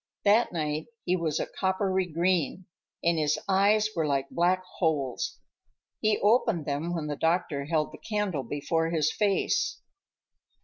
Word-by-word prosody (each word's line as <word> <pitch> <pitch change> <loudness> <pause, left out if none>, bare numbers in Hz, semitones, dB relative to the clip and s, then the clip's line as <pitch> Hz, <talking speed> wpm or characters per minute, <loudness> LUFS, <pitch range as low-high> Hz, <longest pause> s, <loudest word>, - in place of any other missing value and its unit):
That 215 +4 +4
night 155 -2 -2 0.2
he 180 - +2
was 165 -4 -1
a - - -1
coppery 190 -1 0
green, 175 +1 0 0.4
and 170 -1 +2
his 150 -1 +1
eyes 205 +2 +3
were 160 -3 0
like 140 -1 -1
black 180 +2 +2 0.2
holes. 145 -7 0 0.6
He 215 -1 +2
opened 215 - +3
them 155 +5 -2
when 160 -3 -3
the 150 -1 -3
doctor 160 -3 0
held 155 0 0
the - - -10
candle 210 -8 -2
before 145 +5 -1
his 155 -2 +1
face. 210 - +1
170 Hz, 145 wpm, -28 LUFS, 150-190 Hz, 0.6 s, That